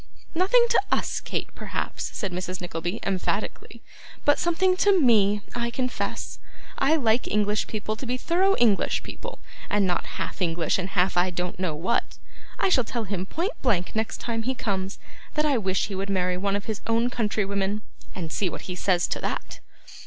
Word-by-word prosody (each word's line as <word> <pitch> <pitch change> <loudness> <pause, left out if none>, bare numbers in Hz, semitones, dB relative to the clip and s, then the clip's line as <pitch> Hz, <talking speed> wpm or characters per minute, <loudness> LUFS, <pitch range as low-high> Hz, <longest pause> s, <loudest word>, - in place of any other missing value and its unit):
'Nothing 395 +8 +5
to - - +5
US, - - +1
Kate, - - -4
perhaps,' - - -3
said 195 -5 -3
Mrs. 180 0 -3
Nickleby, 175 +3 -3
emphatically; 190 -2 -2 0.4
'but 290 - +5
something 365 +2 +3
to 395 -1 +5
ME, 210 -6 +4
I 235 0 -1
confess. 250 +1 -3 0.4
I 280 +4 +4
like 240 -5 +2
English 210 0 +1
people 215 0 -3
to 255 - -6
be 250 +1 0
thorough 375 +8 +3
English 220 -5 +3
people, - - -7 0.3
and 205 -1 +3
not 180 -1 -1
half - - -4
English 165 0 +1
and 185 +1 -2
half 180 -1 +2
I 180 +1 +4
don't 180 0 -3
know 180 -5 0
what. 185 +10 -1 0.4
I - - +2
shall 270 -10 +4
tell 235 +1 -3
him 190 -2 -3
point 355 - -1
blank 200 -9 +1
next 220 0 -1
time 230 -1 -2
he 260 +3 -1
comes, 195 -4 -2 0.4
that 300 - +2
I 280 -5 +3
wish 190 -2 +1
he 205 - -6
would 195 +1 -3
marry 180 -2 +1
one 200 +2 0
of 205 - -2
his 220 -2 -3
own 230 +2 +2
country 215 -3 0
women; 200 +1 -1 0.3
and 165 -4 -4
see 190 +1 +1
what - - -6
he 185 - -5
says 180 -1 +2
to - - -1
that. - - -4
210 Hz, 190 wpm, -26 LUFS, 185-245 Hz, 0.4 s, Nothing